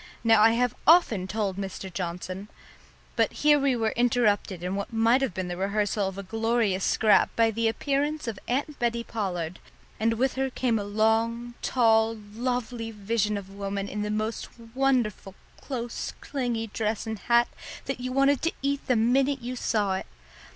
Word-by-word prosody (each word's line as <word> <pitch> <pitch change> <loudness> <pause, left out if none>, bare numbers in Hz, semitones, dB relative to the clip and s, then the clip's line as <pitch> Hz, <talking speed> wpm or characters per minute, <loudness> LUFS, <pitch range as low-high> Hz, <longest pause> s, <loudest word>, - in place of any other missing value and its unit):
"Now 225 -2 +5
I 225 +1 +6
have 245 0 +1
often 270 - +5
told 200 -1 -2
Mr. 190 -1 -6
Johnson 185 +2 -5 0.4
" - - -29
but - - +2
here 295 -1 +4
we 275 -2 +2
were 225 -2 0
interrupted 220 -6 +1
in 180 +1 -2
what 200 +3 -3
might 230 +3 +3
have 270 - 0
been 185 -1 -3
the 175 - -4
rehearsal 200 +1 0
of 190 0 -6
a 200 - -5
glorious 225 -2 0
scrap 215 -2 +4
by 225 -1 +3
the 230 +1 0
appearance 285 +4 -1
of 220 -4 -4
Aunt 285 +4 -2
Bettie 235 -1 0
Pollard, 180 -7 -3 0.4
and 225 +1 +2
with 260 +3 +1
her 265 0 -1
came 245 -3 0
a - - -3
long, 225 +3 0
tall, 225 -2 +3 0.2
lovely 240 -1 -2
vision 210 0 -1
of 200 -2 -7
a - - -13
woman 200 0 -3
in 210 +1 -4
the 210 - -2
most 215 +1 -2 0.2
wonderful 245 -7 0 0.2
close 240 -3 -5
clingy 245 -5 -2
dress 220 0 -2
and 220 -2 -4
hat 235 +3 +3 0.4
that 270 -1 -3
you 255 0 -4
wanted 275 +1 +3
to 330 - 0
eat 280 0 -1
the 255 - +3
minute 260 +4 +2
you 250 +1 -4
saw 210 -5 0
it. 190 - -4
225 Hz, 180 wpm, -27 LUFS, 205-245 Hz, 0.4 s, I